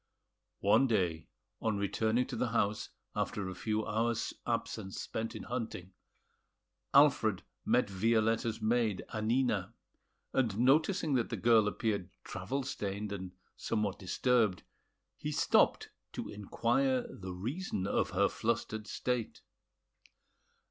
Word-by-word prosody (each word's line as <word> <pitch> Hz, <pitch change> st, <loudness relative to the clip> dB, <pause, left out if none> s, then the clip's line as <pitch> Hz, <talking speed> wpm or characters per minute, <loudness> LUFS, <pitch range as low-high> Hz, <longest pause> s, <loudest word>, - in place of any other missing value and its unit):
One 105 Hz, +7 st, +5 dB
day, 90 Hz, -, 0 dB, 0.3 s
on 110 Hz, -2 st, 0 dB
returning 110 Hz, +4 st, +1 dB
to -, -, -6 dB
the 125 Hz, -, 0 dB
house 110 Hz, -3 st, 0 dB, 0.3 s
after 100 Hz, -2 st, -1 dB
a 95 Hz, -, -4 dB
few 110 Hz, +3 st, -1 dB
hours' 115 Hz, +1 st, 0 dB
absence 95 Hz, 0 st, -2 dB
spent 115 Hz, +1 st, -4 dB
in 110 Hz, -, -6 dB
hunting, 110 Hz, -6 st, -5 dB, 1.0 s
Alfred 140 Hz, -9 st, +5 dB, 0.2 s
met -, -, +3 dB
Violetta's 115 Hz, +3 st, +1 dB
maid, 110 Hz, -3 st, +1 dB
Annina; 110 Hz, -3 st, +1 dB, 0.6 s
and 115 Hz, -6 st, +1 dB
noticing 155 Hz, -, +3 dB
that 120 Hz, -3 st, +1 dB
the -, -, -3 dB
girl 115 Hz, -3 st, +5 dB
appeared 105 Hz, -4 st, -1 dB
travel 135 Hz, +1 st, -3 dB
stained 105 Hz, -5 st, -3 dB
and 95 Hz, -2 st, -5 dB, 0.2 s
somewhat 105 Hz, -3 st, -1 dB
disturbed, 105 Hz, -1 st, +2 dB, 0.5 s
he -, -, -3 dB
stopped -, -, +3 dB, 0.2 s
to -, -, -5 dB
inquire 120 Hz, +5 st, +1 dB
the 95 Hz, -1 st, -8 dB
reason 115 Hz, -, -3 dB
of -, -, +1 dB
her -, -, +3 dB
flustered 110 Hz, -1 st, -2 dB
state. 125 Hz, -3 st, -2 dB
110 Hz, 120 wpm, -33 LUFS, 100-120 Hz, 1.0 s, One